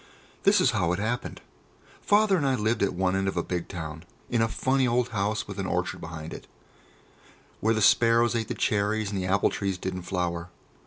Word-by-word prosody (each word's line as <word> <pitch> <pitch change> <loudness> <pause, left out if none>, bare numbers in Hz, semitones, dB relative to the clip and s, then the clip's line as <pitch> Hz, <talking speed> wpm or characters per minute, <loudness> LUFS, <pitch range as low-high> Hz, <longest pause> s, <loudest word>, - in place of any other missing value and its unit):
This - - +6
was - - +4
how 85 -1 +1
it 90 - -2
happened. 115 +4 -3 0.6
Father 205 -1 +4
and 165 - 0
I 135 -1 +2
lived 110 0 0
at 100 -2 +1
one 95 +1 +1
end 95 0 0
of 95 - -2
a 85 - +1
big 90 -2 -3
town, 80 -3 -6 0.3
in 120 -2 +2
a 115 - +3
funny 130 +3 +1
old 120 0 +1
house 105 0 -1
with - - -7
an - - -2
orchard - - -2
behind 80 -1 -7
it, - - -10 1.1
where 115 +1 +2
the 110 - +1
sparrows 115 +2 +4
ate 115 -2 -1
the - - -3
cherries 105 -2 0
and 95 -2 -2
the 90 - -2
apple 100 +2 +2
trees 100 -2 -2
didn't 95 0 -4
flower. 90 -1 -3
100 Hz, 210 wpm, -27 LUFS, 90-115 Hz, 1.1 s, This